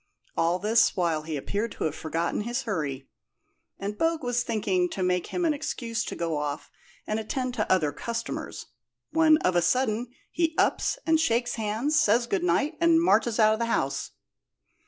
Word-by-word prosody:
All 170 +2 +2
this 220 +3 +3
while 165 -4 +1
he 155 -1 -4
appeared 205 +11 -3
to - - -5
have 155 - 0
forgotten 165 +5 -2
his 240 +4 -2
hurry, 145 - -3 0.7
and 205 +2 -5
Bogue 325 -2 +1
was 245 -1 0
thinking 195 -6 0
to 190 - -3
make 180 -1 0
him 355 - -2
an 315 - +3
excuse 230 -5 -3
to - - -5
go 165 -2 -2
off 145 0 -4 0.3
and 215 +1 -1
attend 255 +3 -3
to - - -1
other 160 -6 +3
customers, 230 +7 -5 0.5
when 320 -1 +5
of 185 - +2
a 175 - +4
sudden 235 +4 +1 0.2
he 325 -1 0
ups - - +1
and 320 -1 +3
shakes 240 -5 +1
hands, 225 +8 0
says 235 +1 +3
good 195 -6 -1
night, 280 - +1
and 335 -1 +5
marches 230 -7 +2
out 215 0 +6
of 220 - -3
the 235 - +1
house. 140 -11 -1
220 Hz, 180 wpm, -27 LUFS, 180-250 Hz, 0.7 s, out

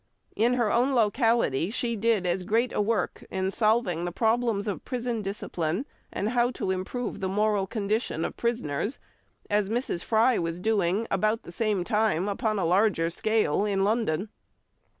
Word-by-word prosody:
In 235 +3 +3
her 235 -4 +1
own 255 +3 +2
locality 225 - +2
she 235 +1 -1
did 220 -3 +1
as 180 +1 0
great 230 +6 +1
a - - +1
work 220 +1 -1
in 190 0 -1
solving 215 -6 +1
the 175 - -2
problems 225 0 +1
of 205 - -3
prison 245 -3 -2
discipline, 195 - -3 0.3
and 205 - -2
how 240 0 +2
to 190 - -2
improve 200 +6 -3
the 190 - -2
moral 205 0 +1
condition 210 -5 -1
of - - -5
prisoners, 235 - -2 0.5
as 205 -1 +1
Mrs. 230 -6 -2
Fry 230 +2 +3
was 165 0 -3
doing 205 0 +1
about 215 +4 +1
the - - -10
same 210 -1 0
time 210 -2 +1
upon 215 +1 -1
a 190 - 0
larger 180 -2 +2
scale 215 -2 +1
in 200 -2 +1
London. 210 -3 0
210 Hz, 165 wpm, -27 LUFS, 190-230 Hz, 0.5 s, In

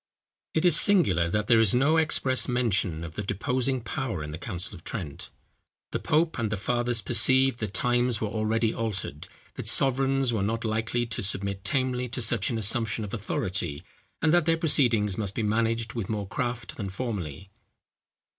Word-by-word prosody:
It 160 - +2
is 170 -3 +6
singular 95 - +3
that 105 +3 0
there 115 -1 +5
is 110 -1 +3
no 145 +6 +3
express 135 -5 +2
mention 100 -10 0
of 85 -1 -7
the 105 - -4
deposing 125 +6 -1
power 115 - -4
in 75 - -6
the 80 - -7
council 90 +1 -3
of 90 - -12
Trent. 85 -11 -5 0.6
The - - -2
pope 160 -1 +1
and 110 -2 -1
the 110 - -1
fathers 120 +2 0
perceived 130 0 +3
that 105 -3 -4
times 120 -1 +1
were 110 - -1
already 110 +1 0
altered, 110 -4 -4 0.3
that - - -6
sovereigns 135 -1 +3
were 110 - 0
not 115 +3 -2
likely 110 +2 -1
to 115 -1 -4
submit 100 0 -2
tamely 130 -1 -1
to 125 +2 -4
such 110 -2 0
an 115 - -2
assumption 110 +1 +1
of 100 - -7
authority, 90 -7 -3 0.4
and 160 0 +4
that 175 -2 +3
their 165 0 +3
proceedings 115 - +3
must 100 -2 -3
be 115 - -1
managed 115 +1 0
with 115 -6 -4
more 105 -3 -3
craft 120 +1 -4
than 100 -3 -4
formerly. 95 - -5
115 Hz, 180 wpm, -27 LUFS, 100-125 Hz, 0.6 s, is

